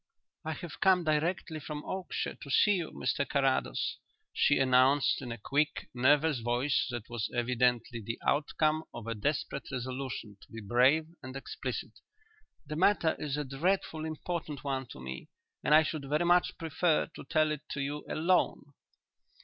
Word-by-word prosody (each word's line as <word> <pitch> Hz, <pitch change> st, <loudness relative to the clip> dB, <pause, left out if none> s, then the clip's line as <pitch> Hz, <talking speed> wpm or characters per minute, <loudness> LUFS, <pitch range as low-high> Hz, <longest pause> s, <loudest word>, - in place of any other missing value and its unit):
"I 160 Hz, -, -2 dB
have 155 Hz, 0 st, -8 dB
come 185 Hz, -2 st, +4 dB
direct 160 Hz, +3 st, 0 dB
from 150 Hz, 0 st, -6 dB
Oakshire 190 Hz, -2 st, -3 dB
to 140 Hz, -, -10 dB
see 205 Hz, +9 st, +5 dB
you, 170 Hz, -3 st, -3 dB
Mr 140 Hz, -, -1 dB
Carrados," 135 Hz, -2 st, 0 dB, 0.4 s
she 145 Hz, -, +3 dB
announced, 135 Hz, +2 st, +4 dB
in 125 Hz, -3 st, -6 dB
a 115 Hz, -, -4 dB
quick, 145 Hz, +8 st, -1 dB
nervous 145 Hz, +3 st, +3 dB
voice 120 Hz, +4 st, +1 dB
that 120 Hz, -3 st, -5 dB
was 120 Hz, -3 st, -3 dB
evidently 120 Hz, -1 st, +1 dB
the 115 Hz, +2 st, -4 dB
outcome 155 Hz, +1 st, +1 dB
of 120 Hz, -2 st, -7 dB
a 115 Hz, -, -2 dB
desperate 140 Hz, +4 st, -2 dB
resolution 130 Hz, -4 st, -5 dB
to -, -, -18 dB
be 115 Hz, -, -7 dB
brave 125 Hz, +9 st, +3 dB, 0.2 s
and 130 Hz, -1 st, -8 dB
explicit. 135 Hz, -, -5 dB, 0.7 s
"The 150 Hz, +2 st, -5 dB
matter 170 Hz, -3 st, +3 dB
is 145 Hz, -1 st, -2 dB
a 150 Hz, -, -1 dB
dreadfully 160 Hz, +3 st, -1 dB
important 155 Hz, -2 st, -4 dB
one 135 Hz, -2 st, -2 dB
to -, -, -11 dB
me 65 Hz, 0 st, -7 dB, 0.3 s
and 150 Hz, -, +5 dB
I 155 Hz, -, +7 dB
should 150 Hz, -3 st, -4 dB
very 150 Hz, +4 st, +2 dB
much 175 Hz, +1 st, +3 dB
prefer 165 Hz, 0 st, +1 dB
to -, -, -8 dB
tell 155 Hz, -1 st, +2 dB
it 150 Hz, -1 st, -3 dB
to 140 Hz, -, -3 dB
you 145 Hz, +2 st, -3 dB
alone." 160 Hz, -3 st, +1 dB
145 Hz, 165 wpm, -31 LUFS, 125-155 Hz, 0.7 s, I